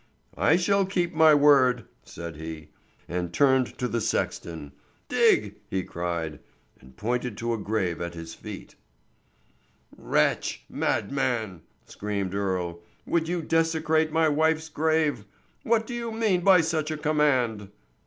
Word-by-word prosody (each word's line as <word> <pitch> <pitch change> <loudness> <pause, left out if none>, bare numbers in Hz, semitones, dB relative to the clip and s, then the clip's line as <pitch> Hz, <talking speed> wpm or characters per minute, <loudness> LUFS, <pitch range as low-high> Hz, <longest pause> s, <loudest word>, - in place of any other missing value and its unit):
"I 160 - +3
shall 195 +3 +2
keep 185 -2 -1
my 160 -1 +6
word," 135 -5 +4 0.2
said 85 -1 -8
he, 80 -1 -8 0.4
and 90 0 -3
turned 130 +1 +2
to 125 - -1
the 115 -1 -2
sexton. 80 -7 -3 0.4
"Dig!" - - +2
he 95 -1 -1
cried, 85 -4 -4 0.4
and 65 0 -18
pointed 120 0 -2
to 115 0 -2
a 115 - -3
grave 100 -5 -2
at 85 0 -5
his 80 0 -8
feet. - - -9 1.2
"Wretch! - - 0
madman!" 120 - -1 0.2
screamed 100 -2 -4
Earle, 90 -4 -2 0.2
"would 165 -1 0
you 175 -1 -2
desecrate 160 -1 +1
my 160 0 +3
wife's 160 +1 +1
grave? 155 -6 +1 0.4
What 225 -1 +1
do 240 - -7
you 235 -1 -4
mean 220 -5 +1
by 185 -1 +6
such 160 -1 -1
a 155 - -3
command?" 130 -9 +1
130 Hz, 135 wpm, -26 LUFS, -, 1.2 s, my